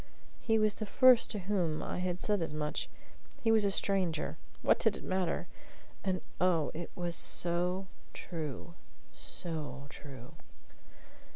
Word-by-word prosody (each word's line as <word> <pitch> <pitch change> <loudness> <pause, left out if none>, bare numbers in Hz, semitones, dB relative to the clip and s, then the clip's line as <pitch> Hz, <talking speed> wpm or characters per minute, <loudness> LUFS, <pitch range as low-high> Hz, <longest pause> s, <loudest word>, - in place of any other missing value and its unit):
He 225 -2 +2
was 215 -1 +3
the 215 - -6
first 255 +1 +5
to 215 - -2
whom 180 -5 -1
I - - -4
had 180 0 -2
said 205 -3 0
as 160 -2 -3
much. 150 0 -2 0.5
He 225 - +3
was 220 -1 +4
a - - +3
stranger. 190 -5 0 0.3
What - - +4
did - - +2
it - - -11
matter? 185 -2 -1 0.6
And, 185 -2 -1 0.2
oh, 175 -4 +2
it 170 +2 -6
was 175 -1 0
so 180 +3 +4 0.3
true 160 -1 -6 0.4
so 155 -4 -4
true. 130 -5 -11
180 Hz, 145 wpm, -32 LUFS, 160-200 Hz, 0.6 s, first